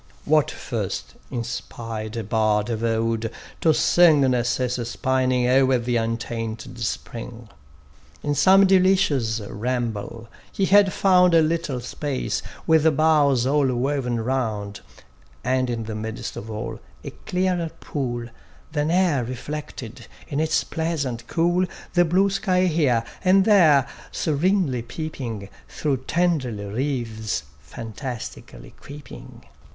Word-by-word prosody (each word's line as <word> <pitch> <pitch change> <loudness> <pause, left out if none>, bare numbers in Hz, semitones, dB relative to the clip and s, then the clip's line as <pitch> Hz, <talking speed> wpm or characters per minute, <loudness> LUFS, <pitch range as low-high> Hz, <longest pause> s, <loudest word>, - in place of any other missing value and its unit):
What 155 -1 +3
first - - -4 0.2
inspired 115 -2 -5
a 115 - -2
bard 110 +1 +1
of 115 0 -3
old 115 0 0 0.3
to 160 - +4
sing 160 -1 +5
Narcissus 125 -1 0
pining 130 -1 +1
o'er 130 0 +4
the 120 0 -1
untainted 115 0 -4
spring? 115 0 -5 0.7
In 145 - 0
some 190 +7 +6
delicious 185 - +3
ramble, 115 0 -4 0.2
he 195 - 0
had 200 0 +5
found 180 -3 +4
A 165 - +7
little 155 -5 -1
space, 135 +2 -3 0.2
with 160 -2 +4
boughs 145 -5 +4
all 140 +1 +3
woven 125 -2 -1
round; 110 -5 -2 0.6
And 130 0 +1
in 115 -2 -2
the 110 0 -5
midst 110 +1 -5
of 110 - -7
all, 110 -1 -5 0.2
a - - -6
clearer 180 -2 -1
pool 120 -5 -3 0.5
Than 150 0 0
e'er 170 -7 +2
reflected 130 -1 -7 0.2
in 140 - -2
its 155 0 +1
pleasant 140 -8 -3
cool, 175 +2 +1 0.3
The 175 -1 +4
blue 190 +4 +3
sky 185 -2 +1
here, 145 -9 +2 0.2
and 190 +1 +5
there, 160 - +5 0.2
serenly 160 -4 +1
peeping 120 -6 -6 0.2
Through 145 -3 -1
tendril 130 - 0
wreaths 115 - -2 0.2
fantastically 115 - -8
creeping. 145 -2 -11
130 Hz, 120 wpm, -23 LUFS, 115-160 Hz, 0.7 s, A